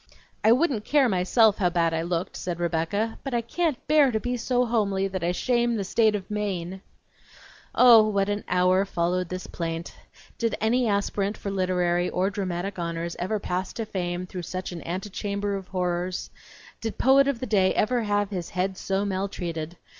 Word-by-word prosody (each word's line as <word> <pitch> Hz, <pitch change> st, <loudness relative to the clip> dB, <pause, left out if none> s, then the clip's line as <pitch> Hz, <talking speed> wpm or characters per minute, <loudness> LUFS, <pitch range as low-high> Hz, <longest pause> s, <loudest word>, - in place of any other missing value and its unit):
"I 220 Hz, -, +6 dB
wouldn't 255 Hz, -4 st, +2 dB
care 280 Hz, +2 st, +3 dB
myself 210 Hz, +2 st, +3 dB
how 180 Hz, -3 st, +3 dB
bad 170 Hz, -1 st, +1 dB
I 165 Hz, -, 0 dB
looked," 170 Hz, +1 st, -2 dB
said 175 Hz, -1 st, -4 dB
Rebecca, 175 Hz, +6 st, -1 dB
"but 270 Hz, -3 st, -3 dB
I 235 Hz, -, +2 dB
can't 300 Hz, +4 st, -2 dB
bear 300 Hz, -2 st, +5 dB
to 220 Hz, -3 st, 0 dB
be 245 Hz, +2 st, -2 dB
so 245 Hz, +1 st, +1 dB
homely 200 Hz, -4 st, +1 dB
that 185 Hz, -2 st, -4 dB
I 175 Hz, -, +1 dB
shame 240 Hz, +4 st, +1 dB
the 205 Hz, -, -1 dB
State 215 Hz, +2 st, +2 dB
of 200 Hz, 0 st, -6 dB
Maine!" 190 Hz, -3 st, -3 dB, 0.9 s
Oh, 230 Hz, -3 st, +8 dB
what 200 Hz, -2 st, +1 dB
an 205 Hz, 0 st, -2 dB
hour 180 Hz, +1 st, +3 dB
followed 180 Hz, -1 st, -1 dB
this 185 Hz, 0 st, -5 dB
plaint! 165 Hz, 0 st, -5 dB, 0.5 s
Did 230 Hz, -1 st, 0 dB
any 235 Hz, +3 st, +2 dB
aspirant 200 Hz, 0 st, 0 dB
for 200 Hz, -, -5 dB
literary 180 Hz, -2 st, +1 dB
or 190 Hz, +2 st, 0 dB
dramatic 190 Hz, -1 st, -3 dB
honors 170 Hz, 0 st, -3 dB
ever 200 Hz, +5 st, -1 dB
pass 185 Hz, -2 st, -3 dB
to 225 Hz, -, -4 dB
fame 180 Hz, -2 st, -3 dB
through 185 Hz, 0 st, -6 dB
such 185 Hz, +2 st, -5 dB
an 170 Hz, -2 st, -7 dB
antechamber 200 Hz, +2 st, -3 dB
of 190 Hz, -2 st, -6 dB
horrors? 180 Hz, 0 st, -2 dB, 0.5 s
Did 225 Hz, -1 st, -4 dB
poet 275 Hz, +2 st, +5 dB
of 280 Hz, -4 st, 0 dB
the 255 Hz, -, -3 dB
day 195 Hz, -5 st, +3 dB
ever 245 Hz, +3 st, +2 dB
have 205 Hz, -1 st, 0 dB
his 180 Hz, -4 st, -4 dB
head 185 Hz, +1 st, -2 dB
so 195 Hz, +1 st, -1 dB
maltreated? 175 Hz, -4 st, -3 dB
195 Hz, 185 wpm, -26 LUFS, 180-220 Hz, 0.9 s, Oh